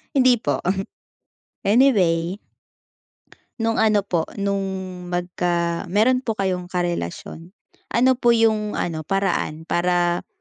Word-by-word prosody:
hindi 255 -2 +5
po, - - -1 1.0
anyway. 195 -7 +3 1.2
No'ng 225 0 0
ano 210 -2 +3
po 170 -5 -1
no'ng 190 -2 -3
magka 175 0 -1
meron 225 +7 +3
po 225 -4 -3
kayong 185 -3 -2
karelasyon, 175 - -4 0.3
ano 255 +3 +3
po 240 -1 +4
yung 215 -2 +1
ano 160 -2 -2
paraan 185 -5 -1
para 175 0 0
190 Hz, 105 wpm, -22 LUFS, 175-220 Hz, 1.2 s, hindi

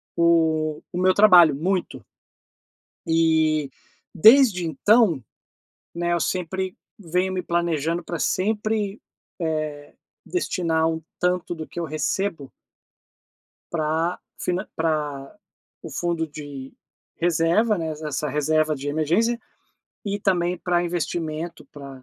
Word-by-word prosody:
o 160 -2 +2
o - - -3
meu 185 0 +4
trabalho. 180 -7 +7
Muito. 170 - -2 1.0
E, 160 -2 +2 0.4
desde 220 - +6
então, 170 - +3 0.7
né, 175 0 0
eu 170 - +1
sempre 185 +2 -2 0.2
venho 180 +1 -1
me 185 - -1
planejando 170 -1 -1
pra 170 - -4
sempre, 210 +2 -1 0.4
eh, 155 -3 -3 0.3
destinar 165 - 0
um 160 0 -3 0.2
tanto 180 -1 0
do 160 -1 -7
que - - -7
eu 170 - -2
recebo 155 0 -2 1.2
pra 165 +2 -1 0.2
finan 180 +3 -2
pra 150 -4 -2 0.5
o - - -8
fundo 170 -2 -2
de 145 -3 -9 0.4
reserva, 175 +6 +2
né, 160 -1 -3
es 155 0 -8
essa 150 -1 -3
reserva 155 +2 +1
de 140 +1 -6
emergência, 175 +11 +1 0.7
e 205 0 -2
também 180 -2 +1
para 175 -1 0
investimento, 165 -1 -3
para, 140 -2 -10
eh, 130 - -20
165 Hz, 115 wpm, -23 LUFS, 155-180 Hz, 1.2 s, trabalho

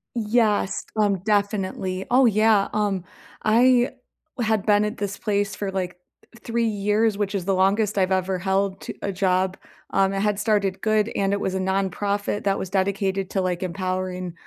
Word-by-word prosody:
Yes, 215 -3 +1
um, 205 -2 +3
definitely. 195 -2 -1
Oh, 260 +1 +5
yeah, 215 -1 +3
um, 205 -4 0 0.4
I 245 +3 +4 0.5
had 220 -3 +1
been 210 0 +4
at 210 - -4
this 205 0 -3
place 205 -2 -1
for 200 -2 -3
like 180 -2 -3 0.5
3 235 0 0
years, 210 +1 +1
which 205 -1 -2
is 185 -3 -2
the 195 - +1
longest 200 +2 +2
I've 190 0 +2
ever 190 0 0
held 190 +1 0
t - - -7
a 200 - -2
job. 185 0 0 0.3
Um, 195 0 +2
it 195 - -1
had 205 0 0
started 200 -3 0
good 215 0 +1
and 195 0 +1
it 200 - 0
was 190 - -2
a - - 0
nonprofit 195 +2 -1
that 195 -1 +1
was 190 - -4
dedicated 195 0 0
to, 195 - 0
like, 180 -1 -1
empowering, 185 -1 -3
200 Hz, 175 wpm, -23 LUFS, 190-210 Hz, 0.5 s, Oh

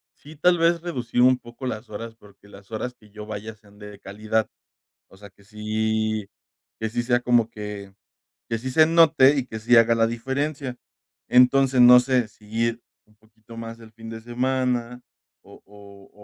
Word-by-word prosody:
sí 150 +2 -15
tal 175 +4 +3
vez, 170 0 +2
reducir 125 -8 -2
un 130 0 +5
poco 120 +1 -11
las 110 -3 -6
horas, 115 +2 -8
porque, 100 -2 -20
las 100 +1 -16
horas 115 +3 -4
que 105 - -21
yo 105 +1 -10
vaya, 110 +1 -7
sean 105 -1 -22
de 105 -1 -11
calidad, 110 +2 -2 0.6
o 95 - -20
sea, 100 0 -13
que 100 +1 -25
si 110 0 -2 0.5
que 110 - -3
sí 120 +2 -2
sea 120 0 +1
como 120 -2 +2
que 105 -3 -8 0.6
que 115 - -1
sí 130 +4 -6
se 155 +5 +5
note, 155 -4 +5
y 130 - -1
que 110 - -7
sí 115 +2 +4
haga 115 0 +5
la 115 0 +2
diferencia. 135 +3 -4 0.5
Entonces, 130 +1 +4
no 125 0 +9
sé, 125 -2 0
si 105 0 -23
ir 115 +1 -1 0.2
un 105 - -29
poquito 110 +1 -18
más 115 0 -8
el 115 -1 -15
fin 115 0 -11
de 115 0 -8
semana, 125 0 -2 0.4
o - - -17
o 100 -1 -16
115 Hz, 185 wpm, -23 LUFS, 110-125 Hz, 0.6 s, no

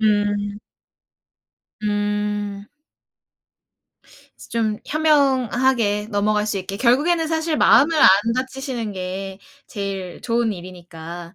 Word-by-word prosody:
음. 205 -1 +1 1.2
음. 205 -1 -2 1.8
좀 220 -2 -1
현명하게 260 -8 +2
넘어갈 210 0 +1
수 210 -2 -1
있게 195 +1 -6
결국에는 295 +9 +2
사실 320 0 -1
마음을 310 +3 +5
안 - - +8 0.3
다치시는 260 -3 -4
게 190 +1 -5 0.3
제일 195 -3 -5
좋은 235 -2 0
일이니까 175 -2 -10
210 Hz, 190 characters per minute, -21 LUFS, 200-255 Hz, 1.8 s, 안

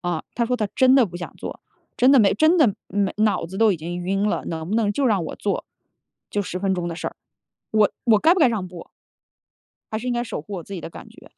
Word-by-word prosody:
啊， 175 -3 -2
他 235 - +1
说 250 +2 0
他 215 -3 -1
真 260 0 +5
的 265 -3 +6
不 175 -1 -9
想 175 - -7
做， - - -7 0.4
真 255 +2 +5
的 270 - +7
没 200 -3 +4
真 315 +9 +4
的 245 - +4
没 200 -1 0
脑 215 -6 +1
子 190 +3 -7
都 220 -3 +5
已 - - -2
经 170 +2 -5
晕 195 +3 0
了， - - -2
能 160 0 -4
不 215 - -1
能 210 -3 +1
就 275 +2 +1
让 200 -7 +1
我 - - -6
做， 205 - -2 0.7
就 205 - -1
10 180 -1 -5
分 195 0 0
钟 175 -1 -3
的 170 - -4
事 - - -3
儿， - - -17 0.6
我 215 -1 +4
我 220 -4 +5
该 320 +9 +5
不 - - -1
该 265 - +6
让 210 -5 -2
步？ 175 -2 -11 1.0
还 220 - -1
是 245 - -7
应 250 - 0
该 240 0 0
守 220 -9 -5
护 200 +4 -8
我 175 - -5
自 200 - -9
己 175 - -5
的 - - -8
感 - - -11
觉？ - - -17
205 Hz, 285 characters per minute, -23 LUFS, 180-235 Hz, 1.0 s, 的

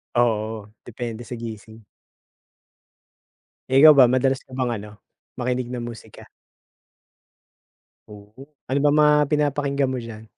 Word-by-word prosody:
Oo, 110 -3 -1 0.2
depende 120 0 -7
sa 125 - -8
gising. 110 -1 -9 1.9
Eh, 130 +1 +4
ikaw 155 0 +9
ba, 125 -3 +6
madalas 130 +1 +1
ka - - -25
bang 130 -2 -2
ano, 105 0 -10 0.4
makinig 125 0 -2
ng 125 - -4
musika? 115 -1 -12 1.8
Oo, 105 +7 -15 0.2
ano 135 +2 0
bang 145 0 +3
mga 150 0 +5 0.2
pinapakinggan 145 -2 0
mo 130 - -3
diyan? 115 -3 -8
120 Hz, 120 wpm, -22 LUFS, 110-135 Hz, 1.9 s, ikaw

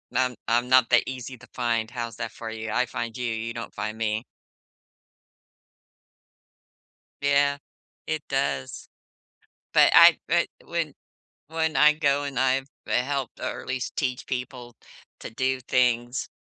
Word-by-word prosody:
I'm 125 -2 +1
I'm 120 +2 +2
not 130 -2 +5
that 120 - +6
easy 130 -1 -6
to 125 - -16
find, 115 -2 0
how's 120 -3 -5
that 115 -1 -4
for 115 -1 -7
you? 110 0 -5
I 125 - +2
find 115 0 -5
you, 125 - -3
you 115 0 -3
don't 115 -3 -7
find 110 +1 -4
me. 110 0 -1 3.0
Yeah, 140 0 +3 0.5
it 155 -1 -3
does. 70 - -2 0.9
But - - +6
I - - +9
eh, - - +3 0.2
when - - -3 0.5
when 160 -2 -1
I 150 +2 +7
go 145 -2 +1
and 140 -3 -4
I've 130 +1 +2 0.2
helped 135 0 -1
or, - - -3
at - - -12
least 130 0 -3
teach 125 -3 -2
people 125 -2 -5 0.4
to - - -7
do 130 +3 -1
things, 120 0 +1
125 Hz, 145 wpm, -26 LUFS, 115-135 Hz, 3.0 s, I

